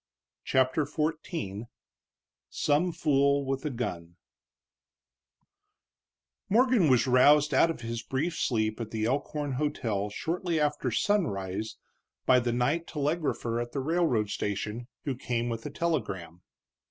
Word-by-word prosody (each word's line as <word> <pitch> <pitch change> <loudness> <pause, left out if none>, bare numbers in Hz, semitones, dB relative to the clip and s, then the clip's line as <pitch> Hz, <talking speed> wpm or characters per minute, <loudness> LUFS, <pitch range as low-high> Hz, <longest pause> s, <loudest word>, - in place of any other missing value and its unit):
CHAPTER 130 +3 +2
XIV 150 - -3 0.8
SOME 155 +5 +1
FOOL 140 -3 +2
WITH 135 0 -2
A - - +1
GUN 85 -10 -5 2.3
Morgan 235 - +4
was 125 0 +4
roused 145 +4 +5
out 165 - +5
of 165 - -4
his 115 0 -4
brief 155 +8 -2
sleep 110 -5 0
at 110 - -4
the 110 -1 -2
Elkhorn 145 +3 -1
hotel 115 -9 -1
shortly 165 - -2
after 150 -3 0
sunrise 110 - -1 0.5
by 130 -1 +6
the 120 -1 -1
night 140 +8 0
telegrapher 145 -6 -1
at 120 0 -6
the 140 - -1
railroad 135 - +1
station, 105 +4 -3 0.2
who 140 - -1
came 120 -1 -2
with 115 +3 -4
a - - -5
telegram. 105 - -3
130 Hz, 125 wpm, -29 LUFS, 115-155 Hz, 2.3 s, by